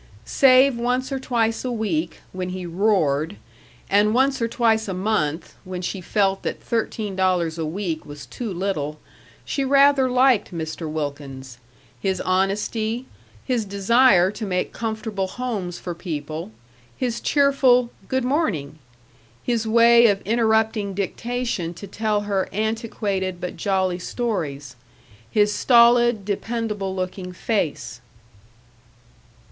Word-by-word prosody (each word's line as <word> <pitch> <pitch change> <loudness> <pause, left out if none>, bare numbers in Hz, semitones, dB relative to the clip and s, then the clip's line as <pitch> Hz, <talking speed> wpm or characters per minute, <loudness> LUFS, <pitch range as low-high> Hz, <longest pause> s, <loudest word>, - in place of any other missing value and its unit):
Save 260 -1 +5
once 250 +3 -1
or 270 - -2
twice 230 -3 0
a 255 - -2
week, 180 -8 -2
when 185 0 -4
he 185 0 -5
roared, 170 -3 +1 0.5
and 210 +2 +3
once 265 0 +2
or 230 - +2
twice 225 -2 +1
a 190 - -3
month, 180 -5 -1
when 185 -1 -6
she 185 +1 -3
felt 195 +1 +1
that - - -4
thirteen 220 -3 -2
dollars 180 -3 +1
a 160 - -1
week 165 -1 -3
was 145 -1 -10
too 235 -4 -6
little, 170 -5 -3 0.5
she 275 - -1
rather 275 -1 +4
liked 250 -4 +3
Mr. 160 -1 -5
Wilkins 140 -4 -6 0.4
his 190 +5 -1
honesty, 210 +5 -1 0.4
his 250 -4 0
desire 200 -1 +4
to 220 - -7
make 180 -3 -2
comfortable 220 -3 -3
homes 200 -6 -4
for 175 - -5
people, 155 - -5 0.5
his 240 -2 -2
cheerful 265 -4 +3 0.2
"Good 260 -1 0
morning!" 185 - -1 0.6
his 230 -2 -1
way 235 +1 +6
of 200 -2 +1
interrupting 220 -2 +1
dictation 205 -3 -3
to 185 - -9
tell 210 +1 -1
her 200 -2 -1
antiquated 205 -3 -2
but 180 - -5
jolly 185 0 0
stories, 155 - -3 0.5
his 210 - +2
stolid, 240 -3 +4
dependable 210 -2 -3
looking 185 0 -4
face. 145 - -2
205 Hz, 125 wpm, -23 LUFS, 180-235 Hz, 0.6 s, way